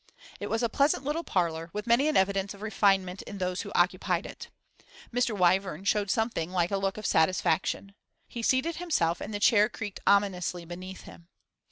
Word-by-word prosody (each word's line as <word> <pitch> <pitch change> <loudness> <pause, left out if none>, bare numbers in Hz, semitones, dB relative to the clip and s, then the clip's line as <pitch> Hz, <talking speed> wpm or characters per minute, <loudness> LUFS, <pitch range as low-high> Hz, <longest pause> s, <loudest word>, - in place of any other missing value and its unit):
It 205 - -5
was 225 +2 0
a - - +3
pleasant 280 +2 +1
little 300 +4 -2
parlour, 165 - -1
with 210 +1 -4
many 240 +5 +3
an 310 - +2
evidence 195 +1 +1
of 200 - -12
refinement 195 -3 +1
in 205 - -9
those 180 -1 -2
who - - -8
occupied 180 0 +1
it. - - -9 0.6
Mr. 245 -3 0
Wyvern 185 -1 +2
showed 205 0 +1
something 225 -7 0
like 180 -1 0
a 200 - +1
look 195 0 -2
of 215 - -7
satisfaction. 185 +3 +1 0.3
He 235 - -6
seated 260 +8 +1
himself, 175 - 0
and - - -5
the 205 - -3
chair 210 0 +5
creaked 205 -4 -6
ominously 180 -3 +1
beneath 185 +2 -8
him. 170 - -14
200 Hz, 185 wpm, -28 LUFS, 180-225 Hz, 0.6 s, chair